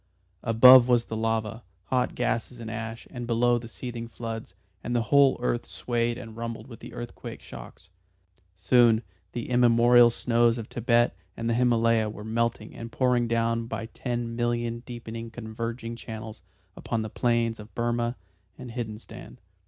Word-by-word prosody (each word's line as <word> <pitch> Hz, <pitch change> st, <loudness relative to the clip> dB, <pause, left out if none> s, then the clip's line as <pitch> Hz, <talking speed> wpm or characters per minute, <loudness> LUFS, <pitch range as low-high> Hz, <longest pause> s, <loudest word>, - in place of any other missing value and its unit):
Above 125 Hz, +2 st, +8 dB
was 120 Hz, -2 st, +3 dB
the 110 Hz, -, -5 dB
lava, 110 Hz, 0 st, -1 dB, 0.3 s
hot 125 Hz, -1 st, +1 dB
gases 120 Hz, 0 st, -2 dB
and 115 Hz, -1 st, -6 dB
ash, 115 Hz, +1 st, -6 dB
and 120 Hz, -1 st, -6 dB
below 120 Hz, +1 st, +3 dB
the 115 Hz, -, -9 dB
seething 120 Hz, 0 st, -6 dB
floods, 115 Hz, -4 st, -7 dB, 0.3 s
and 120 Hz, -, -2 dB
the 120 Hz, -, +2 dB
whole 140 Hz, -1 st, +6 dB
earth 120 Hz, -1 st, 0 dB
swayed 120 Hz, -1 st, -1 dB
and 115 Hz, -3 st, -9 dB
rumbled 115 Hz, 0 st, -5 dB
with 115 Hz, -4 st, -12 dB
the -, -, -10 dB
earthquake 120 Hz, 0 st, -8 dB
shocks. -, -, -12 dB, 0.6 s
Soon 115 Hz, +4 st, +4 dB, 0.3 s
the 120 Hz, -2 st, -4 dB
immemorial 120 Hz, 0 st, +6 dB
snows 120 Hz, 0 st, +2 dB
of 115 Hz, -2 st, -6 dB
Thibet 120 Hz, 0 st, +2 dB, 0.2 s
and 115 Hz, -, -3 dB
the 115 Hz, -, +2 dB
Himalaya 115 Hz, -2 st, +3 dB
were 105 Hz, 0 st, -8 dB
melting 115 Hz, +1 st, -2 dB
and 115 Hz, 0 st, -8 dB
pouring 125 Hz, -2 st, +2 dB
down 115 Hz, 0 st, 0 dB
by 115 Hz, -, -4 dB
ten 120 Hz, 0 st, -4 dB
million 120 Hz, 0 st, -1 dB
deepening 115 Hz, -1 st, -7 dB
converging 115 Hz, +1 st, -5 dB
channels 110 Hz, -1 st, -8 dB, 0.3 s
upon 115 Hz, -1 st, -2 dB
the 110 Hz, -, -5 dB
plains 115 Hz, -2 st, +1 dB
of 105 Hz, +1 st, -12 dB
Burmah 120 Hz, 0 st, 0 dB, 0.4 s
and 125 Hz, -2 st, -8 dB
Hindostan. 115 Hz, 0 st, -7 dB
115 Hz, 155 wpm, -27 LUFS, 115-120 Hz, 0.6 s, Above